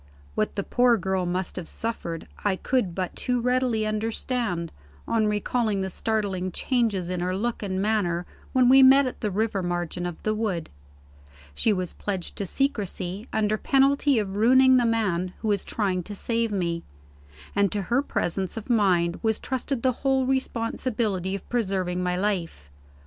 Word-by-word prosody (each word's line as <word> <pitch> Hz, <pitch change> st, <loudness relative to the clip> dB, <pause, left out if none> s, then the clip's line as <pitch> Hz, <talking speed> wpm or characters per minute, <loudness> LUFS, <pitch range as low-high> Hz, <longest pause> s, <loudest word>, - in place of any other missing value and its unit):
What 215 Hz, -, -1 dB
the 200 Hz, -, -1 dB
poor 245 Hz, +1 st, +3 dB
girl 190 Hz, -1 st, -1 dB
must 180 Hz, +2 st, -2 dB
have 175 Hz, -3 st, -5 dB
suffered, 170 Hz, -8 st, -4 dB, 0.2 s
I 205 Hz, -2 st, +2 dB
could 195 Hz, -4 st, -1 dB
but 185 Hz, -2 st, -3 dB
too 250 Hz, -1 st, 0 dB
readily 250 Hz, -2 st, +1 dB
understand, 215 Hz, -4 st, -2 dB, 0.4 s
on 220 Hz, -2 st, +2 dB
recalling 210 Hz, 0 st, 0 dB
the 190 Hz, 0 st, -3 dB
startling 195 Hz, -4 st, -1 dB
changes 220 Hz, -6 st, 0 dB
in 180 Hz, 0 st, -2 dB
her 180 Hz, +1 st, -1 dB
look 235 Hz, +3 st, -2 dB
and 190 Hz, -2 st, -2 dB
manner 190 Hz, -5 st, 0 dB, 0.3 s
when 255 Hz, -1 st, +4 dB
we 265 Hz, +2 st, +8 dB
met 270 Hz, +1 st, +7 dB
at 255 Hz, -, -5 dB
the 215 Hz, -, 0 dB
river 205 Hz, 0 st, 0 dB
margin 175 Hz, 0 st, -2 dB
of 175 Hz, -, -8 dB
the 215 Hz, -, +1 dB
wood. 205 Hz, -7 st, -2 dB, 0.8 s
She 220 Hz, -, +1 dB
was 185 Hz, -3 st, -1 dB
pledged 190 Hz, -4 st, -4 dB
to 200 Hz, -, -2 dB
secrecy, 205 Hz, -5 st, -2 dB
under 215 Hz, -1 st, +1 dB
penalty 275 Hz, 0 st, +3 dB
of 200 Hz, -3 st, -1 dB
ruining 260 Hz, +4 st, +6 dB
the 240 Hz, -2 st, +3 dB
man 185 Hz, -6 st, 0 dB
who 220 Hz, -, 0 dB
was 200 Hz, -2 st, +1 dB
trying 190 Hz, -4 st, -1 dB
to 205 Hz, +4 st, -7 dB
save 230 Hz, +2 st, 0 dB
me; 170 Hz, -4 st, -1 dB, 0.7 s
and 200 Hz, -1 st, +3 dB
to 205 Hz, -1 st, -1 dB
her 240 Hz, +8 st, +1 dB
presence 190 Hz, -, -2 dB
of 225 Hz, +2 st, -4 dB
mind 180 Hz, -6 st, +2 dB
was 220 Hz, -1 st, +1 dB
trusted 260 Hz, -1 st, -2 dB
the 260 Hz, -, +4 dB
whole 265 Hz, -1 st, +2 dB
responsibility 230 Hz, -6 st, -1 dB
of 200 Hz, -, -8 dB
preserving 190 Hz, -6 st, -1 dB
my 180 Hz, 0 st, 0 dB
life. 180 Hz, -, -2 dB
210 Hz, 170 wpm, -25 LUFS, 185-235 Hz, 0.8 s, we